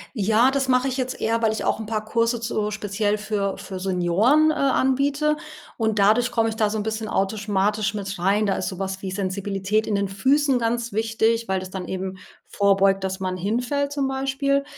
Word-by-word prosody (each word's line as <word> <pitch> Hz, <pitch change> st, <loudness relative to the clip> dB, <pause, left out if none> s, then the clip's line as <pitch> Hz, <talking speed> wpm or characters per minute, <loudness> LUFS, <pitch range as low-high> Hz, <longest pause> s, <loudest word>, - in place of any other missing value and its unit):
Ja, 220 Hz, +4 st, +3 dB
das 270 Hz, -1 st, 0 dB
mache 255 Hz, +1 st, +3 dB
ich 260 Hz, -, -2 dB
jetzt 255 Hz, 0 st, -3 dB
eher, 230 Hz, +1 st, 0 dB
weil 220 Hz, -, +3 dB
ich 220 Hz, -, -3 dB
auch -, -, +1 dB
'n 220 Hz, -, -6 dB
paar 215 Hz, -1 st, -2 dB
Kurse 230 Hz, +1 st, +1 dB
zu 215 Hz, -2 st, -2 dB
speziell 205 Hz, 0 st, -1 dB
für 205 Hz, -2 st, -2 dB
für 190 Hz, -1 st, -7 dB
Senioren, 195 Hz, -, +3 dB
äh, -, -, -1 dB
anbiete 280 Hz, +2 st, +1 dB, 0.4 s
und 220 Hz, -2 st, -1 dB
dadurch 220 Hz, +5 st, +4 dB
komme 225 Hz, -1 st, +1 dB
ich 220 Hz, -, -5 dB
da 215 Hz, -2 st, +1 dB
so 220 Hz, -, -2 dB
'n 210 Hz, -, -2 dB
bisschen 220 Hz, 0 st, -3 dB
automatisch 205 Hz, +1 st, 0 dB
mit 195 Hz, -2 st, -5 dB
rein. 200 Hz, +4 st, +2 dB
Da 195 Hz, -, +1 dB
ist -, -, -3 dB
sowas 190 Hz, 0 st, -4 dB
wie 190 Hz, -, -4 dB
Sensibilität 195 Hz, +2 st, -1 dB
in 210 Hz, -, 0 dB
den 200 Hz, 0 st, 0 dB
Füßen 265 Hz, +6 st, +2 dB
ganz 235 Hz, -1 st, -1 dB
wichtig, 225 Hz, +1 st, +1 dB
weil 190 Hz, -1 st, 0 dB
das 185 Hz, 0 st, -8 dB
dann 190 Hz, -2 st, -5 dB
eben 190 Hz, 0 st, -4 dB, 0.3 s
vorbeugt, 195 Hz, -1 st, +2 dB
dass 190 Hz, 0 st, -3 dB
man 185 Hz, -1 st, -2 dB
hinfällt 245 Hz, +9 st, -1 dB
zum 280 Hz, -2 st, -1 dB
Beispiel. 275 Hz, +1 st, 0 dB
215 Hz, 205 wpm, -23 LUFS, 195-245 Hz, 0.4 s, dadurch